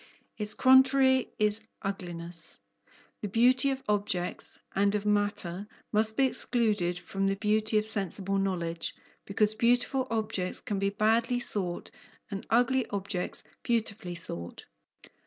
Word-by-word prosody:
Its 210 -1 -1
contrary 260 0 +5
is 215 +1 +3 0.2
ugliness. 175 -4 -6 0.6
The 210 - -2
beauty 250 +6 +4
of 270 0 -3
objects 200 -4 -1 0.2
and 200 +1 +2
of 210 0 -2
matter 205 -2 -1 0.2
must 220 +1 +1
be 270 - +5
excluded 215 -9 +1
from 195 +3 -2
the 195 - +1
beauty 215 +1 +1
of 210 - +1
sensible 195 -2 -1
knowledge, 170 -4 -2 0.3
because 210 +1 +1
beautiful 245 +3 +2
objects 215 -5 -1
can 200 -2 -3
be 195 0 +1
badly 225 +4 +1
thought 185 -7 -4 0.4
and 195 -1 -5
ugly 245 +1 +2
objects 195 -2 -3 0.2
beautifully 220 -6 -1
thought. 85 - -8
210 Hz, 125 wpm, -29 LUFS, 195-230 Hz, 0.6 s, contrary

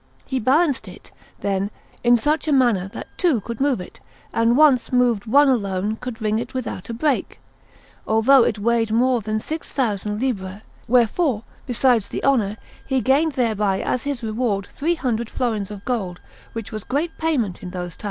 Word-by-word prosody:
He 265 - -2
balanced 280 +4 +2
it, - - -12 0.3
then, 195 0 0 0.3
in 240 0 +6
a 300 +5 0
manner 240 -9 +3
that 195 - -10
two 335 - +3
could 230 +4 -6
move 275 -6 +2
it, 180 - -10 0.3
and 230 +2 +3
once 285 -6 +4
moved 245 -4 +2
one 285 +6 +5
alone 205 -4 0
could 250 0 -7
ring 215 0 0
it 240 +2 -6
without 240 -6 -4
a - - -3
break, 285 +2 -1 0.7
although 235 +4 +5
it 220 - 0
weighed 225 +1 +1
more 245 +2 +2
than 215 +1 -2
six 315 +8 -5
thousand 210 -5 -1
libbre; 205 -5 -3 0.2
wherefore, 245 +1 +2 0.2
besides 245 -3 +2
the - - -5
honour, 220 -7 +2 0.3
he 265 -1 +1
gained 280 +5 +2
thereby 210 -6 +1
as 250 - -1
his 280 -4 -4
reward 215 -3 -1
three 335 +4 0
hundred 235 -6 -2
florins 220 -6 -2
of 205 -1 -9
gold, 195 -8 -2 0.3
which 225 -2 -6
was 215 -2 -5
great 310 +5 -2
payment 265 - 0
in 180 - -6
those 180 -2 -5
times. - - -26
235 Hz, 175 wpm, -22 LUFS, 210-265 Hz, 0.7 s, in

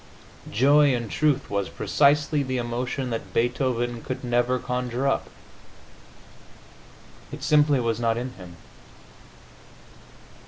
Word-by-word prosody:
Joy, 140 +4 +4
in 120 -2 -4
truth, 145 0 +1
was 100 -3 -2
precisely 145 - +2
the 130 -1 -2
emotion 125 +2 -3
that 115 - -5
Beethoven 120 -1 0
could 130 -1 -6
never 120 +1 +1
conjure 125 +1 -2
up; 135 - 0 2.0
it - - -8
simply 150 -2 +4
was 115 -2 -1
not 115 -1 +1
in 125 +2 -4
him. 90 -4 -12
125 Hz, 110 wpm, -25 LUFS, 120-140 Hz, 2.0 s, Joy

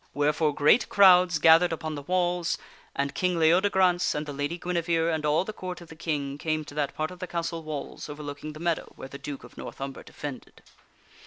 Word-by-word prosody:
Wherefore 150 +1 +1
great 150 +11 +4
crowds 180 -3 +6
gath 160 +2 +7
ered 180 - +1
upon 155 -1 -3
the 145 - -5
walls, 175 +1 0 0.4
and 140 0 -1
King 180 +1 0
Leodegrance 180 +2 +3
and 150 +1 -2
the 145 - -6
Lady 145 +4 -2
Guinevere 170 -2 0
and 155 -1 -2
ail 150 +3 +3
the 215 - -6
Court 185 -2 -6
of 170 -2 -13
the 160 - -11
King 145 -3 -3
came 155 -1 -1
to - - -11
that 145 -2 -2
part 155 +2 -2
of 180 - -11
the 185 - -5
castle 170 -1 -3
walls 155 -1 -6
overlooking 145 0 -7
the 155 - -10
meadow 170 -1 -2
where 135 - -9
the 140 - -9
Duke 145 -2 -7
of - - -13
North - - -8
Umber 135 0 -5
defended. 145 -3 -9
160 Hz, 215 wpm, -27 LUFS, 145-175 Hz, 0.4 s, gath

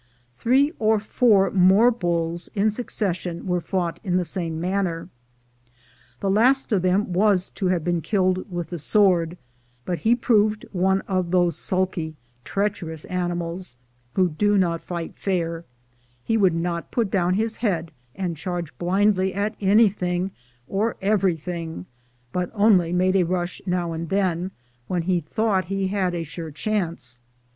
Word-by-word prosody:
Three 265 - +2
or 220 0 +3
four 210 -1 +3
more 195 +6 +5
bulls 170 -5 -2
in 210 +1 +3
succession 185 -6 -3
were 180 -2 0
fought 175 -2 -2
in 180 -3 +1
the 180 - 0
same 165 -1 -3
manner. 180 -1 -1 1.1
The 195 - 0
last 255 +6 +3
of 200 -4 +3
them 185 +1 +1
was 190 -1 +3
to 190 - -2
have 180 -3 +1
been 175 0 0
killed 185 0 0
with 175 -2 -4
the 175 - -5
sword; 175 -1 +3 0.5
but 175 -2 -2
he 230 +2 +3
proved 215 -3 +2
one 190 +1 +2
of 185 -3 -1
those 175 -1 +2
sulky, 185 -4 -1 0.3
treacherous 190 - -3
animals 175 -4 -3 0.4
who 185 -1 +3
do 205 +6 +2
not 170 -3 +1
fight 170 -2 -5
fair; 170 -3 -2 0.6
he 225 - 0
would 190 -6 +3
not 170 0 -2
put 225 -5 -1
down 180 -2 +2
his 220 +2 -1
head 170 -8 -1 0.2
and 180 -3 -2
charge 170 0 -4
blindly 190 +1 +2
at 205 +2 -1
anything 195 -3 +2 0.4
or 215 +6 -1
everything, 175 - -1 0.5
but 180 -1 -1
only 200 -5 +4
made 185 +1 +2
a 190 - +5
rush 175 0 -2
now 180 -2 0
and 165 0 -4
then, 185 -2 0 0.4
when 180 -2 -1
he 180 0 +1
thought 190 +4 0
he 195 +1 -1
had 190 -3 0
a 170 - -2
sure 165 +1 -7
chance. 165 - -3
185 Hz, 150 wpm, -23 LUFS, 170-200 Hz, 1.1 s, more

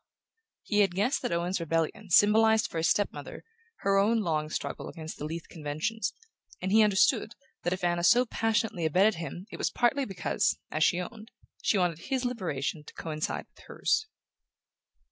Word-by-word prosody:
He 210 - 0
had 195 -3 +3
guessed 240 +9 +1
that - - -2
Owen's 175 +2 0
rebellion 165 +5 -2
symbolized 220 +4 +5
for 165 - -2
his 165 - +2
step 205 - +1
mother - - -9 0.4
her 195 0 +3
own 220 +3 +3
long 155 -5 -1
struggle - - -4
against 160 -2 -8
the 150 - -4
Leath 165 +2 -5
conventions, 170 +8 -3 0.5
and 185 - -2
he 220 +2 +6
understood 215 +2 +3 0.3
that 175 - -1
if 185 0 -3
Anna 175 0 +1
so 245 +7 +5
passionately 225 -6 0
abetted 190 +5 +3
him 175 +2 -6
it - - -7
was - - 0
partly 270 +3 +1
because, 195 -5 0
as 155 - +1
she 175 - +3
owned, 215 +5 -7 0.3
she 210 - +2
wanted 175 -4 +1
his 265 +5 -2
liberation 165 - -2
to - - -13
coincide 155 -2 -3
with - - -20
hers. 435 - 0
190 Hz, 175 wpm, -29 LUFS, 165-220 Hz, 0.5 s, he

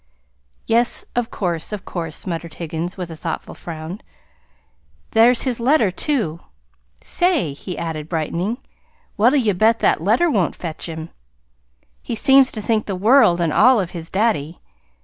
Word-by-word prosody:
"Yes, 235 +1 +2
of 240 -2 -1
course, 170 -3 -3
of 205 -2 -6
course," 165 -3 -5
muttered 165 -2 -5
Higgins, 170 +2 -5
with 180 -3 -5
a - - -7
thoughtful 160 - -5
frown. 165 +4 -8 1.1
"There's 230 +2 +4
his 250 -3 -1
letter, 235 -4 +3
too. 190 - -1 0.6
Say!" 350 - +1
he 175 +5 -7
added, 160 -2 -5
brightening, 170 +7 -2 0.6
"what'll 240 +7 +4
you 225 -6 +2
bet 220 +5 +3
that - - +2
letter 225 - +3
won't 200 - 0
fetch 165 0 -5
him? 160 0 -7 0.9
He - - -4
seems 270 +2 +5
to 215 - -4
think 220 -1 0
the 195 - -2
world 205 -2 +4
and 165 -3 0
all 250 +2 +5
of 180 -3 -3
his 165 -1 -7
daddy. 190 -7 0
190 Hz, 150 wpm, -20 LUFS, 165-235 Hz, 1.1 s, seems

